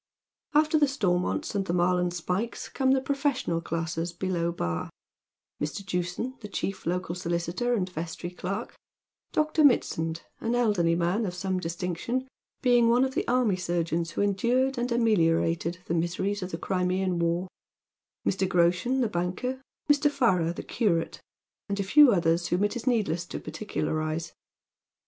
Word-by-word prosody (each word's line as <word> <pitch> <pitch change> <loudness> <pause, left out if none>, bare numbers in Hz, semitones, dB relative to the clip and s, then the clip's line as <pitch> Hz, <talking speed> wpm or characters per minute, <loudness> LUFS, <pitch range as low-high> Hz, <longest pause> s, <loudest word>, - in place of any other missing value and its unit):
After 310 +1 +4
the 290 - +5
Stonnonts 185 -9 0
and 195 -2 -1
the 170 - 0
Marlin 180 0 +2
Spykes 180 +6 -3
come 265 -1 0
the 265 - +2
profes 275 -1 0
sional 165 -1 -1
classes 165 +1 -2
below 175 -1 -1
Bar; 85 - -3 0.7
Mr. 150 +6 -3
Jewson, 180 +8 -3
the 210 - -7
chief 195 -3 -4
local 180 0 -1
solicitor 175 +7 -1
and 185 -5 0
vestry 175 0 -5
clerk; 185 +2 -4 0.6
Dr. 310 0 +2
Mitsand, 165 - +2 0.2
an 230 +1 -1
elderly 205 -9 +2
man 175 +6 +1
of 180 - -4
some 185 0 -1
distinc 170 0 -3
tion, 255 +2 -2 0.4
being 240 -2 +5
one 245 +3 +4
of 265 - -3
the - - -1
army 245 -5 +3
surgeons 170 -2 -1
who 170 - -2
endured 245 +6 +1
and 245 +1 -1
ameliorated 170 -7 +2
the - - -2
miseries 185 +5 -1
of 185 - -4
the 165 - -4
Crimean 185 0 0
war; 170 +2 0 0.8
Mr. 190 0 +1
Groshen, 180 +10 +2
the 240 - +2
banker; 205 +8 -2 0.3
Mr. 290 0 +4
FaiTcr, 185 - +2
the - - -6
curate; 180 -9 0 0.5
and 200 0 -2
a - - +1
few 280 +7 +7
others, 170 -2 +2
whom 180 +3 +1
it 205 +3 0
is 240 - -5
needSss 205 -9 +1
to - - -4
par - - -8
dcuiarize. 155 -6 -2
185 Hz, 160 wpm, -27 LUFS, 170-240 Hz, 0.8 s, few